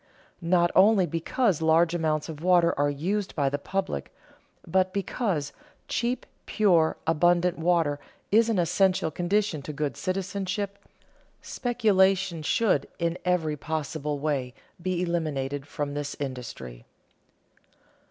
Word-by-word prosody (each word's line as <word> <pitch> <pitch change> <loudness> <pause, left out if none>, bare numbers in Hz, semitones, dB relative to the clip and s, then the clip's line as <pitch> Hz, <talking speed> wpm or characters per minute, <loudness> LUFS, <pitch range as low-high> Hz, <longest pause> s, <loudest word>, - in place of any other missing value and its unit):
Not 175 0 +2
only 200 -1 +5
because 170 - 0
large 165 +1 +4
amounts 155 -3 0
of 155 -2 -8
water 175 -1 +4
are 145 +1 +1
used 185 +8 -2
by 140 -3 +1
the 145 +1 -2
public, 185 - -3 0.5
but 185 +2 +1
because 195 - -2 0.3
cheap, 245 +1 -1 0.2
pure, 175 -7 +3
abundant 175 +2 +2
water 165 -4 +1 0.3
is 225 +2 +4
an 225 - +1
essential 180 -1 +2
condition 180 0 0
to 145 - -6
good 150 -1 -3
citizenship, 195 +1 -3 0.6
speculation 195 -7 +1
should 155 -1 +1
in 170 0 -1
every 165 -4 +1
possible 150 -1 -3
way 140 -4 -2 0.3
be 180 0 -1
eliminated 145 -5 -2
from 145 -1 -4
this 145 0 -4
industry. 120 - -7
170 Hz, 120 wpm, -26 LUFS, 150-190 Hz, 0.6 s, only